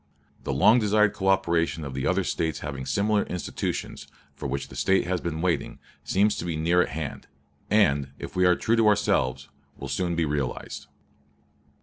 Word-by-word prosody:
The - - -1
long 105 - +5
desired 105 -1 +3
coöperation 85 -4 +1
of 70 - -6
the 65 0 -2
other 95 +1 +1
States 80 -4 -2
having 70 -3 -5
similar 100 +8 +1
institutions, 90 - -4 0.3
for 75 - -6
which 70 +1 -4
the - - -11
State 95 +9 +2
has 90 0 -1
been 80 -2 -3
waiting, 85 -6 -1 0.3
seems 105 +2 +2
to - - -4
be 85 -2 -2
near 85 +3 +3
at - - 0
hand; 75 0 -6 0.4
and, 70 -10 +3
if - - -8
we 90 0 +4
are 90 - +5
true 115 - +1
to 115 -1 +4
ourselves, 70 -10 +1 0.3
will 70 - -7
soon 85 +5 -1
be 85 -1 +1
realized." 70 -4 -4
85 Hz, 180 wpm, -26 LUFS, 70-95 Hz, 0.4 s, long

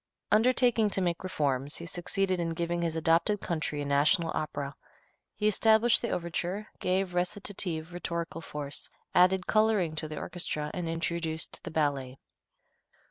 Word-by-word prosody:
Undertaking 235 -1 +4
to 195 - 0
make 175 -2 -1
reforms, 145 -5 0
he 170 - -6
succeeded 185 +2 -1
in 165 -1 -1
giving 170 0 -1
his 165 -1 -1
adopted 165 +6 +2
country 155 -5 -2
a - - -5
national 150 +4 +3
opera. 145 -2 -3 0.6
He 210 - +1
established 220 +3 +4
the 235 - -2
overture, 175 +4 -2
gave 185 0 0
recitative 180 -2 -2
rhetorical 170 -1 -4
force, 145 -3 -5 0.2
added 180 +1 +4
coloring 215 -7 +2
to 155 - -1
the 155 0 -7
orchestra, 155 -4 -3
and 175 -2 -3
introduced 165 -1 -3
the 175 - -5
ballet. 140 -5 -1
170 Hz, 140 wpm, -29 LUFS, 155-190 Hz, 0.6 s, Undertaking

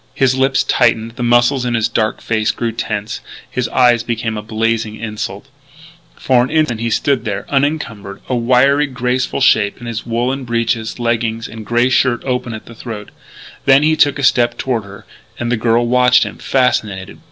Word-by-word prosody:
His 135 -2 +3
lips 135 0 +2
tightened, 115 -2 +1
the 120 +2 -9
muscles 120 +2 +3
in 120 -1 -1
his 115 -1 +1
dark 110 -2 -1
face 110 -1 0
grew 115 -1 -1
tense; 110 -1 -4 0.3
his 125 -2 -2
eyes 120 -2 +3
became 115 -1 -3
a 105 - -4
blazing 110 0 -1
insult. 110 0 -6 0.7
For 125 -2 +2
an 130 - -3
instant 155 -8 +1
he 115 0 -1
stood 140 +4 +1
there, 100 -4 -4
unencumbered, 135 -9 -2
a - - -2
wiry, 130 +5 +3
graceful 125 +1 -2
shape 105 -5 +3
in 120 - -10
his 115 -1 -4
woollen 125 +4 -2
breeches, 115 -1 -1
leggings, 115 -1 -1
and 110 0 -9
grey 120 +2 +2
shirt 130 -1 +2
open 125 -3 -2
at 110 - -10
the 115 - -12
throat. 110 -3 -8 0.5
Then 135 +2 +5
he 155 +1 +3
took 145 -2 +3
a 140 - -4
step 120 -2 +3
toward 120 -5 -2
her. 100 0 -12 0.3
And 120 0 -2
the - - +3
girl 115 +1 +1
watched 125 +1 +4
him, - - -7
fascinated. 105 -7 -1
120 Hz, 185 wpm, -16 LUFS, 110-130 Hz, 0.7 s, Then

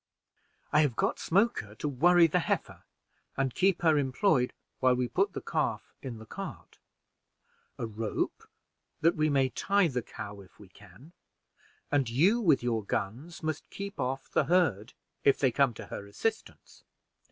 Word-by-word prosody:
I 150 - +6
have 140 -6 +1
got - - 0
Smoker 190 - +1
to 150 - -3
worry 170 +5 +5
the 165 - +2
heifer - - -3 0.5
and 135 -2 0
keep 190 -2 +2
her 160 -3 +5
employed, 135 -1 +2 0.3
while 130 -1 +4
we 125 0 0
put 195 +8 0
the - - -6
calf 125 -7 -2
in 125 -4 -6
the 110 - -11
cart; - - -8 1.0
a - - -3
rope 110 0 -3 0.5
that 165 +2 +4
we 155 0 +2
may 135 -2 +2
tie 200 +6 +2
the 125 -3 -2
cow 100 -2 -8
if 95 -4 -19
we - - -15
can; 145 +7 -17 0.8
and 140 -5 +2
you 180 - +3
with 160 - +3
your 115 -3 0
guns 125 - -4
must 155 -1 -3
keep 200 0 -7
off 135 +1 -2
the - - +1
herd 145 - +1 0.3
if 140 - +5
they 130 -3 +2
come 135 0 +3
to - - -8
her 100 - -7
assistance. 220 - -4
140 Hz, 165 wpm, -29 LUFS, 120-170 Hz, 1.0 s, I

